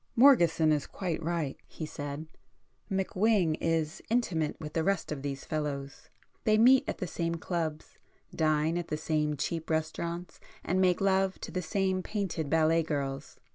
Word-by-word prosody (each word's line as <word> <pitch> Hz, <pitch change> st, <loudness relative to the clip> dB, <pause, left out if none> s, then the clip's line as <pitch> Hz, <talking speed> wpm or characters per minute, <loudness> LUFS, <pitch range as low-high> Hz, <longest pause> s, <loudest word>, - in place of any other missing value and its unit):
"Morgeson 170 Hz, -, +6 dB
is 150 Hz, -2 st, 0 dB
quite 175 Hz, -5 st, -3 dB
right,"—he 165 Hz, -1 st, -4 dB
said—"McWhing 170 Hz, +6 st, -2 dB
is 160 Hz, -2 st, 0 dB
intimate 180 Hz, -10 st, 0 dB
with 150 Hz, -1 st, -7 dB
the 165 Hz, -, +1 dB
rest 195 Hz, -3 st, 0 dB
of 145 Hz, -3 st, -3 dB
these 140 Hz, -1 st, -4 dB
fellows—they 150 Hz, +8 st, -3 dB
meet 260 Hz, +5 st, +6 dB
at -, -, -2 dB
the 185 Hz, -, -3 dB
same 170 Hz, -1 st, -2 dB
clubs, 160 Hz, -2 st, -4 dB, 0.4 s
dine 155 Hz, +1 st, +2 dB
at 170 Hz, -, -5 dB
the 150 Hz, -, -2 dB
same 150 Hz, -1 st, 0 dB
cheap 165 Hz, +3 st, -3 dB
restaurants 165 Hz, +2 st, -3 dB, 0.2 s
and 185 Hz, +2 st, +1 dB
make 180 Hz, -1 st, +3 dB
love 190 Hz, -1 st, +2 dB
to -, -, -6 dB
the 185 Hz, -, -2 dB
same 190 Hz, +2 st, 0 dB
painted 185 Hz, -7 st, -3 dB
ballet 160 Hz, +1 st, +4 dB
girls. 140 Hz, -3 st, -3 dB
165 Hz, 145 wpm, -30 LUFS, 155-185 Hz, 0.4 s, Morgeson